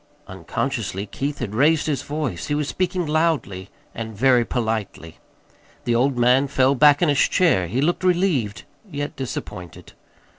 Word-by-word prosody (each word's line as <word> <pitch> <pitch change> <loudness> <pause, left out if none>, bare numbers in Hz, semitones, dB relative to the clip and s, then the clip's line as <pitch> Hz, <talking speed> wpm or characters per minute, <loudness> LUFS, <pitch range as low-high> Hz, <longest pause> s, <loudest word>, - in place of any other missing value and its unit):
Unconsciously 100 +2 -4
Keith 140 +7 -4
had 110 -5 -5
raised 150 +6 +3
his 145 -5 -1
voice. 145 - -4
He 145 - -1
was 150 -1 -1
speaking 185 0 -1
loudly, 150 - -1 0.2
and 110 -2 -7
very 125 0 +4
politely. 110 -9 -4 0.6
The 120 - 0
old 125 +2 +1
man 125 +3 +3
fell 135 -1 +2
back 145 +3 +5
in 165 - +3
his 145 -2 +2
chair. 160 - +2
He 120 +10 -1
looked 175 +5 0
relieved, 170 - 0 0.3
yet 145 -3 -5
disappointed. 100 - -7
135 Hz, 150 wpm, -22 LUFS, 110-150 Hz, 0.6 s, back